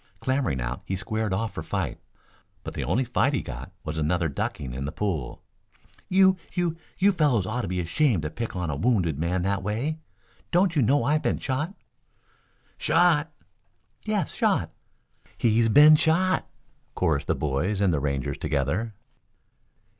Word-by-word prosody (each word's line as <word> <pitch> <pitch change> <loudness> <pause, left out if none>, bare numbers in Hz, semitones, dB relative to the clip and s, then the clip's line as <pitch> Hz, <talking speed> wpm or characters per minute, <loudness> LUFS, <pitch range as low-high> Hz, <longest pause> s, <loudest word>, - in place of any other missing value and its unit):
Clambering 130 - 0
out - - -3
he 95 - -3
squared 110 +2 -2
off 110 +4 -1
for - - -5
fight, - - -3 0.6
but - - -6
the - - -3
only 130 - +1
fight 125 +3 +1
he - - 0
got 65 +1 -7
was 80 +1 -4
another 80 +2 +1
ducking 65 -2 -4
in 65 +2 -4
the 75 - -3
pool. 85 -12 -3 0.7
"You 190 0 +5 0.2
you 175 -3 0 0.2
you 200 +2 +4
fellows 145 - +2
ought 120 +5 -2
to - - -4
be 90 +1 -2
ashamed 95 - +1
to 75 - -3
pick 115 +1 -5
on 90 -4 -2
a - - -3
wounded 85 - +1
man 90 +2 0
that 100 0 0
way. 120 +11 -2 0.5
Don't 180 0 +2
you 145 - +3
know 135 +5 +3
I've 150 +2 +2
been - - 0
shot?" 150 +9 -3 1.0
"Shot?" 165 -2 +3 0.7
"Yes, - - -1
shot." - - +1 0.7
"He's 115 0 +3
been 150 +6 +8
shot," 180 +5 +2 0.5
chorused 70 -3 0
the - - +1
boys 75 +8 -1
and 100 -4 +3
the 75 - +1
Rangers 70 -2 -2
together. 80 - -1
105 Hz, 160 wpm, -26 LUFS, -, 1.0 s, been